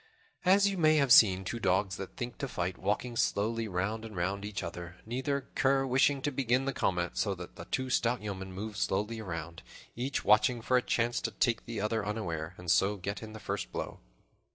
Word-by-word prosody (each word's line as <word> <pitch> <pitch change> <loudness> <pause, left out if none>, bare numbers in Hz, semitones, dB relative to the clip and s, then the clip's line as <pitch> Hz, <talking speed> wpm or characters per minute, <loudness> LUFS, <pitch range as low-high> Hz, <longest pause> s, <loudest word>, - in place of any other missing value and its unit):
As 195 +2 +6
you 195 -2 -1
may 155 -1 +5
have 140 -4 +3
seen 95 -5 +7
two 115 +5 -4
dogs 95 -1 +1
that 95 - -8
think 120 0 -5
to 135 - -2
fight, 90 -6 -3
walking 105 +5 -1
slowly 115 +1 0
round 100 +4 -2
and 110 -2 -8
round 95 +3 -1
each 105 -1 -4
other, 85 0 -6
neither 130 +5 -1
cur 135 0 +2
wishing 135 +1 +2
to 145 - 0
begin 130 0 +1
the 135 - -1
combat, 90 -5 -1
so 100 -2 +1
those 90 0 -8 0.2
two 130 -1 -2
stout 120 0 +2
yeomen 95 -2 -5
moved 105 +2 -6
slowly 105 +4 -1
around, 85 -5 -6 0.3
each 130 +3 -2
watching 110 +3 +4
for 125 +3 +1
a 125 - +5
chance 120 -1 0
to - - -1
take 115 +2 0
the 115 -2 -4
other 105 +1 0
unaware, 90 -6 -3
and 90 -1 -2
so 100 +2 +3
get 100 +2 -4
in 110 -1 -8
the 110 - -8
first 100 - -4
blow. - - -5
110 Hz, 205 wpm, -31 LUFS, 95-125 Hz, 0.3 s, seen